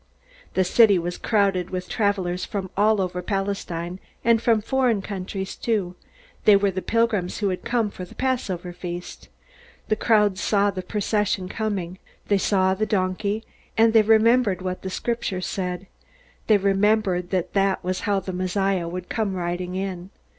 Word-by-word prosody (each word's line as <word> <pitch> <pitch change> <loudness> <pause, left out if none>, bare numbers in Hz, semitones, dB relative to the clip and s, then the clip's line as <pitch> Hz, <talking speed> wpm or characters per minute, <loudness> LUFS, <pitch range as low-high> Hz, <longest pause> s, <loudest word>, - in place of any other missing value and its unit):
'" - - -26
The 190 - +4
city 205 +1 +5
was 175 +1 -3
crowded 195 -5 +1
with 185 -1 -4
travelers 185 -3 0
from 190 -3 -4
all 210 +1 +3
over 180 -1 -2
Palestine, 185 -3 -3 0.3
and 230 -1 +4
from 230 -2 +3
foreign 235 -2 +1
countries 190 -1 -5
too. 200 -6 -1 0.5
They 210 - +8
were 200 0 +3
the 185 0 -3
pilgrims 230 -6 0
who 205 -2 0
had 185 - -3
come 235 -4 0
for 185 - -8
the 180 - -11
Passover 190 -9 -2
feast. 175 0 -7 0.6
The 215 - +3
crowds 210 -4 +2
saw 205 -1 +2
the 185 - -5
procession 205 -1 -1
coming. 190 -4 -3 0.3
They 200 -1 +3
saw 190 -1 +2
the 215 +3 -1
donkey, 200 +2 -1 0.3
and 225 0 +5
they 225 - +7
remembered 220 -2 +3
what 185 0 -3
the 190 - -4
Scriptures 195 -3 -2
said. 180 -1 -3 0.6
They 215 - +6
remembered 195 -2 +2
that 185 -3 -1
that 195 -1 +1
was 185 +1 -1
how 200 -2 0
the 185 0 -5
Messiah 185 0 0
would 180 +1 -5
come 210 -4 -1
riding 180 0 -3
in. 185 -1 -4
195 Hz, 165 wpm, -24 LUFS, 185-215 Hz, 0.6 s, They